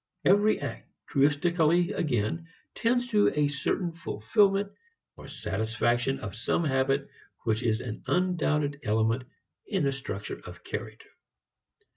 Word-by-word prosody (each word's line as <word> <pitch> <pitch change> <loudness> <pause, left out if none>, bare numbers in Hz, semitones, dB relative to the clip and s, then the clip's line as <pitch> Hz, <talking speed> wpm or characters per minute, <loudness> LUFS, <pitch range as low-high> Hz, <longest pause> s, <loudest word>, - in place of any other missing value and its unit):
Every 205 +3 +5
act, - - -6 0.2
truistically 165 +4 +3
again, 145 +3 -1 0.3
tends 245 +2 +1
to 210 -2 +4
a 150 -1 +3
certain 150 +5 -1
fulfilment 195 - +1 0.4
or - - -11
satisfaction 120 +2 -1
of 100 - -6
some 115 +8 0
habit 135 -1 +1 0.4
which 110 -1 +1
is 115 -2 +1
an 115 -3 -6
undoubted 150 -5 +1
element 110 +2 +1 0.4
in 195 -6 0
the 140 - +2
structure 115 -7 -5
of - - -11
character. - - -6
140 Hz, 120 wpm, -28 LUFS, 115-175 Hz, 0.4 s, Every